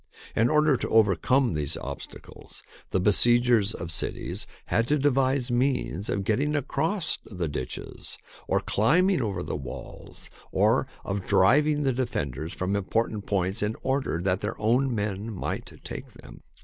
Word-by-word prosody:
In 115 Hz, +2 st, +3 dB
order 150 Hz, -2 st, +4 dB
to -, -, -3 dB
overcome 110 Hz, -, +3 dB
these 75 Hz, -2 st, -1 dB
obstacles, 70 Hz, +2 st, -9 dB, 0.3 s
the -, -, +1 dB
besiegers 115 Hz, +2 st, +3 dB
of 85 Hz, 0 st, -6 dB
cities 80 Hz, -, -2 dB, 0.2 s
had 115 Hz, 0 st, +1 dB
to 150 Hz, -, +3 dB
devise 135 Hz, -2 st, +2 dB
means 120 Hz, -, 0 dB
of 100 Hz, -, -1 dB
getting 140 Hz, +9 st, +1 dB
across 155 Hz, +6 st, 0 dB
the 90 Hz, -5 st, -4 dB
ditches 70 Hz, -4 st, -5 dB, 0.3 s
or -, -, +2 dB
climbing 165 Hz, -, +3 dB
over 100 Hz, -6 st, -2 dB
the -, -, -3 dB
walls, 70 Hz, -4 st, -9 dB, 0.2 s
or 110 Hz, +7 st, +3 dB, 0.2 s
of 100 Hz, -1 st, -3 dB
driving 150 Hz, +9 st, +4 dB
the 135 Hz, -2 st, +2 dB
defenders 80 Hz, -, -3 dB
from 95 Hz, +2 st, -2 dB
important 105 Hz, +1 st, -1 dB
points 95 Hz, +1 st, 0 dB
in 105 Hz, +2 st, 0 dB
order 130 Hz, -10 st, 0 dB
that 90 Hz, +1 st, 0 dB
their 105 Hz, -, -4 dB
own 120 Hz, +4 st, +2 dB
men 105 Hz, +1 st, -2 dB
might 100 Hz, -, -4 dB
take -, -, -7 dB
them. -, -, -13 dB
110 Hz, 150 wpm, -27 LUFS, 95-135 Hz, 0.3 s, order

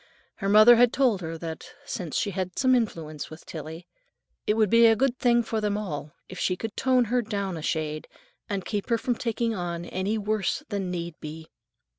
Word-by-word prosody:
Her 195 Hz, -, -2 dB
mother 215 Hz, +3 st, +8 dB
had 245 Hz, 0 st, +5 dB
told 245 Hz, -8 st, +2 dB
her 165 Hz, -1 st, -5 dB
that, 160 Hz, -1 st, -7 dB
since 170 Hz, -5 st, -4 dB
she 205 Hz, -, 0 dB
had 185 Hz, -1 st, -4 dB
some 260 Hz, 0 st, +4 dB
influence 165 Hz, -, -2 dB
with 155 Hz, -, -12 dB
Tillie, 160 Hz, +2 st, -8 dB, 0.6 s
it 210 Hz, -, +3 dB
would 215 Hz, -3 st, +2 dB
be 230 Hz, 0 st, +7 dB
a 225 Hz, -, +5 dB
good 255 Hz, +2 st, 0 dB
thing 240 Hz, -1 st, +3 dB
for 220 Hz, -1 st, -2 dB
them 210 Hz, -1 st, 0 dB
all 155 Hz, -7 st, -5 dB
if 185 Hz, -, -9 dB
she 180 Hz, -, 0 dB
could 225 Hz, +3 st, -5 dB
tone 255 Hz, -2 st, +3 dB
her 245 Hz, +3 st, +1 dB
down 200 Hz, -4 st, -3 dB
a 160 Hz, -, -6 dB
shade 155 Hz, -1 st, -2 dB, 0.4 s
and 195 Hz, -2 st, -2 dB
"keep 205 Hz, +1 st, -3 dB
her 230 Hz, -, +3 dB
from 245 Hz, +2 st, -1 dB
taking 230 Hz, -1 st, -1 dB
on 175 Hz, -3 st, -4 dB
any 190 Hz, +5 st, -2 dB
worse 215 Hz, -, -1 dB
than 200 Hz, -3 st, -2 dB
need 170 Hz, -1 st, -4 dB
be." 160 Hz, +1 st, -8 dB
200 Hz, 205 wpm, -26 LUFS, 170-230 Hz, 0.6 s, mother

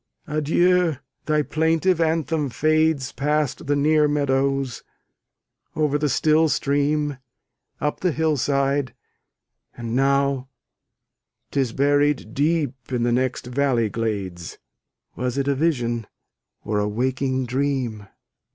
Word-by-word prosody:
adieu! 165 Hz, +2 st, +2 dB, 0.3 s
thy 150 Hz, -1 st, +2 dB
plaintive 165 Hz, +3 st, +1 dB
anthem 160 Hz, -2 st, 0 dB
fades 155 Hz, -1 st, +1 dB
Past 150 Hz, +1 st, -1 dB
the 145 Hz, -, +2 dB
near 150 Hz, +1 st, +3 dB
meadows, 135 Hz, -3 st, 0 dB, 0.9 s
over 150 Hz, -1 st, +1 dB
the 150 Hz, 0 st, +1 dB
still 155 Hz, +4 st, +3 dB
stream, 145 Hz, 0 st, 0 dB, 0.6 s
Up 150 Hz, -, -2 dB
the 180 Hz, -, +1 dB
hill 160 Hz, 0 st, +1 dB
side; 140 Hz, 0 st, 0 dB, 0.8 s
and 115 Hz, -1 st, -4 dB
now 135 Hz, 0 st, +1 dB, 1.0 s
'tis 135 Hz, -4 st, 0 dB
buried 145 Hz, -3 st, +1 dB
deep 150 Hz, -2 st, +1 dB, 0.2 s
In 120 Hz, -2 st, 0 dB
the 120 Hz, -, +2 dB
next 125 Hz, +1 st, 0 dB
valley 125 Hz, -3 st, +1 dB
glades: 100 Hz, -6 st, -4 dB, 0.6 s
Was 125 Hz, +1 st, -2 dB
it 140 Hz, 0 st, 0 dB
a 140 Hz, -, +3 dB
vision, 120 Hz, -7 st, 0 dB, 0.6 s
or 105 Hz, -1 st, 0 dB
a 105 Hz, -, 0 dB
waking 130 Hz, +3 st, -1 dB
dream? 125 Hz, -5 st, -2 dB
140 Hz, 115 wpm, -23 LUFS, 125-150 Hz, 1.0 s, near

